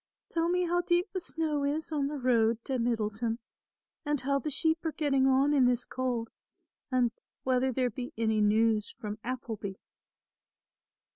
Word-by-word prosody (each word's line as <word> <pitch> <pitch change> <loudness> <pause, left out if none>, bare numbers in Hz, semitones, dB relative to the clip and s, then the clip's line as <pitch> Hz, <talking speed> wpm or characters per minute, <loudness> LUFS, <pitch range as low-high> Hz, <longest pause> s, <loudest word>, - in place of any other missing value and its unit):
Tell 335 0 +1
me 360 +1 +2
how 350 +1 +2
deep 350 +1 +1
the 370 - -2
snow 315 -4 -1
is 300 +3 -1
on 290 -3 0
the 295 +1 -4
road 230 -3 +2
to 260 -2 -1
Middleton 225 -1 0 0.7
and 295 -2 0
how 275 +2 +1
the 305 - -3
sheep 320 +3 +1
are 320 - 0
getting 275 -3 +2
on 270 +2 +4
in 270 -3 +5
this 245 -1 +1
cold 245 -3 -2 0.6
and 250 -2 +3 0.3
whether 260 0 +2
there 250 0 0
be 245 +3 -6
any 220 -1 +2
news 215 0 +3
from 210 0 -5
Appleby." 230 -5 -4
260 Hz, 160 wpm, -30 LUFS, 230-295 Hz, 0.7 s, in